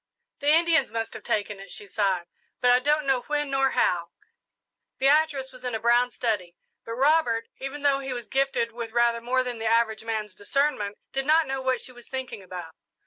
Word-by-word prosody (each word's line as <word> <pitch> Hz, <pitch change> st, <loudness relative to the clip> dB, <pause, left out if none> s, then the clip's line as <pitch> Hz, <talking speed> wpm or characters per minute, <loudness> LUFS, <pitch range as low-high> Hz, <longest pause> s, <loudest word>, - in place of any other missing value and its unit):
"The 285 Hz, -, -4 dB
Indians 330 Hz, +1 st, +4 dB
must 225 Hz, 0 st, -3 dB
have -, -, -8 dB
taken 205 Hz, -1 st, -2 dB
it," 195 Hz, -2 st, -10 dB
she 205 Hz, +2 st, -5 dB
sighed, 195 Hz, -3 st, 0 dB, 0.3 s
"but 245 Hz, -, +4 dB
I 250 Hz, -, +6 dB
don't 295 Hz, +3 st, +1 dB
know 265 Hz, -2 st, +2 dB
when 295 Hz, -1 st, -1 dB
nor 270 Hz, 0 st, +3 dB
how." 170 Hz, -1 st, +2 dB, 0.9 s
Beatrice 280 Hz, -1 st, +2 dB
was 255 Hz, 0 st, -14 dB
in 250 Hz, -2 st, -2 dB
a -, -, -2 dB
brown 240 Hz, +2 st, +3 dB
study, 210 Hz, -8 st, -2 dB, 0.3 s
but 230 Hz, -, -6 dB
Robert, 265 Hz, -4 st, +3 dB
even 275 Hz, +2 st, -6 dB
though 280 Hz, -1 st, +3 dB
he 270 Hz, -1 st, -5 dB
was 240 Hz, -3 st, -5 dB
gifted 265 Hz, -4 st, 0 dB
with 230 Hz, -1 st, -6 dB
rather 235 Hz, -1 st, +2 dB
more 255 Hz, +2 st, +1 dB
than 245 Hz, -2 st, -4 dB
the 225 Hz, -, -2 dB
average 225 Hz, -1 st, +2 dB
man's 215 Hz, -3 st, -3 dB
discernment, 205 Hz, 0 st, -1 dB, 0.2 s
did 270 Hz, 0 st, -1 dB
not 315 Hz, +1 st, +5 dB
know 270 Hz, -1 st, -3 dB
what 260 Hz, -2 st, 0 dB
she 255 Hz, -, -7 dB
was 240 Hz, -1 st, -14 dB
thinking 260 Hz, -5 st, -5 dB
about. 180 Hz, -3 st, -8 dB
245 Hz, 200 wpm, -26 LUFS, 220-270 Hz, 0.9 s, I